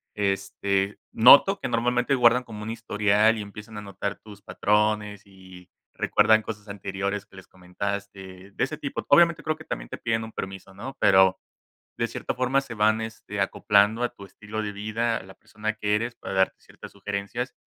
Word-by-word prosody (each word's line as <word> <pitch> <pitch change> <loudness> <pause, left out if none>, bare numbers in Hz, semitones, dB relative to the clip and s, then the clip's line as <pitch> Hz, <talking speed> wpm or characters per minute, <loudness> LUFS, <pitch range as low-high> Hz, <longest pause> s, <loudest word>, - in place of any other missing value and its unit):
Este, 100 0 -1
noto 140 - +7
que - - -3
normalmente 120 +2 +1
guardan 125 0 +4
como 110 -3 -9
un 110 - -4
historial, 105 -1 +2
y - - -4
empiezan 105 +1 -10
a - - -5
notar 100 0 -5
tus 105 -2 -13
patrones 105 -1 0
y 95 -2 -15 0.2
recuerdan 110 0 +3
cosas 105 -1 -8
anteriores 100 0 -4
que - - -20
les 95 - -12
comentaste 95 +1 -6
de - - -2
ese - - -2
tipo. - - -5
Obviamente, 170 -2 +5
creo 155 - -1
que 160 0 -14
también - - -5
te - - -6
piden 115 0 -1
un 110 - -8
permiso, 95 -1 -7
¿no? 130 +8 -8
Pero 95 -1 +5 0.6
de 115 - 0
cierta - - -4
forma 130 +2 +1
se 125 -4 -9
van, 110 +1 +2
este, 110 -2 -5
acoplando 105 +3 +2
a 120 - +1
tu 100 - -12
estilo 105 +3 -7
de 105 -1 -3
vida, 110 +3 -2
a - - -8
la 95 0 -13
persona 110 +2 -5
que 105 -1 0
eres, 115 +3 -2
para 100 - -7
darte 95 0 +1
ciertas - - -13
sugerencias, 100 +5 -4
105 Hz, 185 wpm, -25 LUFS, 100-115 Hz, 0.6 s, noto